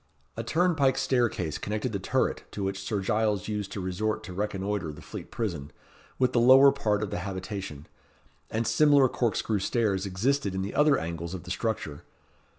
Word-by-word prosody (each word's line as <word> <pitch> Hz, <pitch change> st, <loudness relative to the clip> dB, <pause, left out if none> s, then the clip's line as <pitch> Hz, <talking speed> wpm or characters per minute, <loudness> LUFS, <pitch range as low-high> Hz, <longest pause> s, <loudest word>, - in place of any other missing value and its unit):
A 115 Hz, -, -3 dB
turnpike 150 Hz, 0 st, +2 dB
staircase 120 Hz, -, 0 dB
connected 110 Hz, +4 st, -2 dB
the 100 Hz, -, -2 dB
turret -, -, 0 dB
to 100 Hz, -, -4 dB
which 95 Hz, 0 st, -2 dB
Sir 105 Hz, -4 st, -2 dB
Giles 105 Hz, 0 st, 0 dB
used 105 Hz, -2 st, -3 dB
to -, -, -4 dB
resort 105 Hz, +4 st, -2 dB
to 95 Hz, -, -8 dB
reconnoitre 100 Hz, -3 st, -2 dB
the 75 Hz, -, -11 dB
Fleet -, -, -9 dB
Prison, 85 Hz, -11 st, -4 dB, 0.5 s
with 130 Hz, -1 st, +2 dB
the 120 Hz, -, +4 dB
lower 130 Hz, +3 st, +8 dB
part 105 Hz, -3 st, 0 dB
of 105 Hz, -, -4 dB
the -, -, -2 dB
habitation, 95 Hz, -5 st, -5 dB, 0.6 s
and 115 Hz, +1 st, -1 dB
similar 140 Hz, +4 st, +5 dB
corkscrew 115 Hz, -3 st, 0 dB
stairs 100 Hz, -2 st, 0 dB
existed 100 Hz, +2 st, 0 dB
in 95 Hz, -, -1 dB
the 100 Hz, -, -4 dB
other 150 Hz, 0 st, +4 dB
angles 85 Hz, +2 st, -4 dB
of 90 Hz, -, -8 dB
the 90 Hz, -, -7 dB
structure. 95 Hz, -9 st, -3 dB
105 Hz, 175 wpm, -28 LUFS, 95-120 Hz, 0.6 s, lower